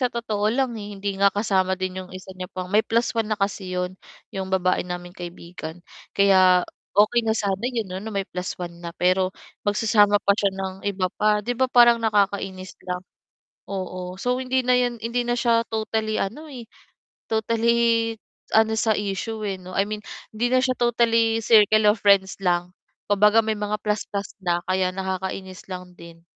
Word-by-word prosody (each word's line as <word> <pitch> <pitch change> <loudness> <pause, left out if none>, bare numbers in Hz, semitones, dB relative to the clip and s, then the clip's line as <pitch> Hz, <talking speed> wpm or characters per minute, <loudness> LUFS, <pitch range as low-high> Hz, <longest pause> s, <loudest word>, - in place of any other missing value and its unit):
sa 250 - +2
totoo 215 -3 -1
lang, 255 +2 0
eh, 205 -2 -7
hindi 200 0 -2
nga 200 - +6
kasama 190 -2 0
din 185 0 -4
'yong 185 - -10
isa 190 0 -10
niya 185 -1 -7
pang 185 0 -7
may 210 - +6
+1 225 -1 0
na 215 - 0
kasi 195 -2 -2
'yon, 180 0 -2 0.4
'yong 190 -1 -4
babae 185 -1 +1
naming 175 0 -6
kaibigan, 175 -1 -9 0.3
kaya 185 -2 +5 0.3
okey 215 +4 +5
na 220 -1 0
sana 195 -3 -1
'yon 230 -5 -3
'no 185 - -4
na 215 - -6
may 200 -3 -2
+1 180 -1 -5
na 170 - -6
pero 185 +1 +2 0.4
magsasama 205 -1 +4
pa 200 -1 +3
siya 200 0 +1
ng 190 -1 -4
iba 185 -2 -2
pa, 210 0 +1
'di 245 - -1
ba 260 +2 +1
parang 240 -1 +6
nakakainis 200 -3 0 0.2
lang 180 0 -3 0.6
oo 185 -2 -5
so 250 +2 0
hindi 260 0 0
na 250 0 +4
yun 245 -1 0
hindi 235 +2 -1
na 240 - +2
siya 235 -1 +3
totally 220 0 -1
ano, 245 +11 -4
eh, 245 -3 -8 0.7
totally 230 +1 +2 0.4
ano 220 0 +4
sa 220 -1 +2
issue, 210 +2 -3
eh, 195 -2 -3
no, 185 +1 -9
I 195 - +3
mean 215 0 -4 0.4
hindi 235 +3 0
na 255 0 +3
siya 255 -1 +1
totally 230 -1 +2
circle 215 -1 +5
of 210 - 0
friends 195 -1 +4
lang, 175 -1 +1 0.4
kumbaga 210 +2 +5
may 220 -1 -1
mga 210 0 -2
plus-plus 205 -1 -3
na 175 -1 +1
kaya 185 0 +1
nakakainis 190 0 -5
lang 180 0 -7
din. 170 0 -13
205 Hz, 180 wpm, -23 LUFS, 185-225 Hz, 0.7 s, nga